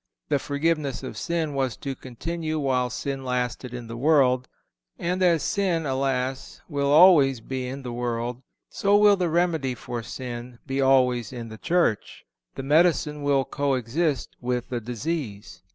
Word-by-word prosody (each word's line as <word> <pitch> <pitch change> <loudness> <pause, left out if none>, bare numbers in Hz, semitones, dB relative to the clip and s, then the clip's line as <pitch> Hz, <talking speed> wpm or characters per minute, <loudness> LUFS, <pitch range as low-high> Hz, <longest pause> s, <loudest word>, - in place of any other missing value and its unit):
The 145 -2 +2
forgiveness 145 -3 -1
of 130 - -6
sin 165 -3 -2
was 135 -3 -1
to 140 - -4
continue 155 +6 -4
while 130 -4 +1
sin 135 +2 -4
lasted 125 0 -2
in 120 -1 -6
the 115 0 -7
world; 130 -2 +3 0.5
and 180 +2 -2
as 170 -4 +3
sin, 180 -5 0
alas! 130 -1 -2
will 140 -3 -1
always 145 -5 +6
be 130 +2 -4
in 135 +2 -6
the 125 -2 -5
world, 120 0 -3 0.3
so 200 +1 +2
will 205 -1 +6
the 180 -3 0
remedy 160 -6 +1
for 120 +1 -5
sin 120 +3 -7
be 135 0 -1
always 125 -4 +3
in 120 -3 -7
the 110 0 -10
Church. 170 -12 0 0.3
The 135 - -5
medicine 150 0 +2
will 140 -2 +2
co 140 -2 0
exist 135 +4 -1
with 125 -1 -2
the 120 -2 -3
disease. 120 -2 -5
135 Hz, 160 wpm, -25 LUFS, 125-155 Hz, 0.5 s, always